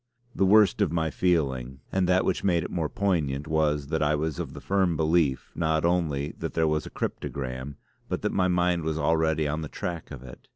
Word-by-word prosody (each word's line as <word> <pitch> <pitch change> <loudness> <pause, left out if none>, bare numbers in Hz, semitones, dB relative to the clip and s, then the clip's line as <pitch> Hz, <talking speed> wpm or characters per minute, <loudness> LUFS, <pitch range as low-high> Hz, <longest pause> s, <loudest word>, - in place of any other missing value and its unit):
The 95 - +2
worst 105 -1 +5
of - - +2
my 80 -2 0
feeling, 65 -7 0
and 95 -1 +1
that 95 0 +3
which - - 0
made 85 -4 +2
it - - -6
more 80 -4 -1
poignant, 75 -8 -1
was 75 -2 0
that 80 0 -1
I 75 0 +2
was 75 -1 -2
of - - -4
the - - -8
firm 95 -4 +1
belief 80 -4 +1
not 80 -1 0
only 80 -4 0
that 80 - -4
there 80 -1 +2
was 75 0 0
a - - -7
cryptogram 65 +1 -4 0.3
but - - -3
that - - 0
my 90 - +2
mind 90 -1 +2
was 80 0 -2
already 80 -1 +1
on 75 +2 -2
the 80 - -5
track 85 -2 -5
of 70 -4 -9
it. 60 - -12
80 Hz, 215 wpm, -27 LUFS, 75-90 Hz, 0.3 s, worst